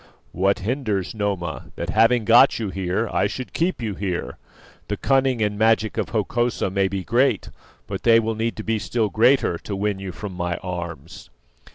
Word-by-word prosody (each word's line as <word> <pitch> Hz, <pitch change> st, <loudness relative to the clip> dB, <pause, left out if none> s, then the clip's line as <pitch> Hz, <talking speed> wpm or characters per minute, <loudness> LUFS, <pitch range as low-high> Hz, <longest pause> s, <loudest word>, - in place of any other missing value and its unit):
"What 95 Hz, +3 st, +1 dB
hinders, 105 Hz, -3 st, -2 dB
Noma, 100 Hz, -6 st, -3 dB
that 85 Hz, +2 st, -4 dB
having 115 Hz, +2 st, +3 dB
got 120 Hz, +4 st, +6 dB
you 110 Hz, -4 st, -3 dB
here 95 Hz, +4 st, -1 dB
I -, -, +2 dB
should 125 Hz, +5 st, -6 dB
keep 170 Hz, -6 st, -1 dB
you 105 Hz, -2 st, -2 dB
here? 95 Hz, -2 st, -4 dB, 0.5 s
The -, -, -2 dB
cunning 130 Hz, -4 st, +2 dB
and 105 Hz, 0 st, -1 dB
magic 110 Hz, -1 st, +2 dB
of -, -, -2 dB
Hokosa 115 Hz, -1 st, -1 dB
may 95 Hz, 0 st, +1 dB
be 95 Hz, -1 st, -3 dB
great, 125 Hz, +8 st, +1 dB, 0.3 s
but -, -, -5 dB
they 115 Hz, -1 st, +5 dB
will 115 Hz, 0 st, -1 dB
need 115 Hz, +1 st, -2 dB
to 110 Hz, -, -6 dB
be 110 Hz, 0 st, 0 dB
still 105 Hz, +3 st, -1 dB
greater 115 Hz, -5 st, +3 dB
to 100 Hz, -, -5 dB
win 100 Hz, 0 st, -1 dB
you 95 Hz, -1 st, -5 dB
from 100 Hz, +1 st, -7 dB
my 90 Hz, -1 st, -2 dB
arms." 85 Hz, -6 st, -7 dB
105 Hz, 185 wpm, -23 LUFS, 95-115 Hz, 0.5 s, got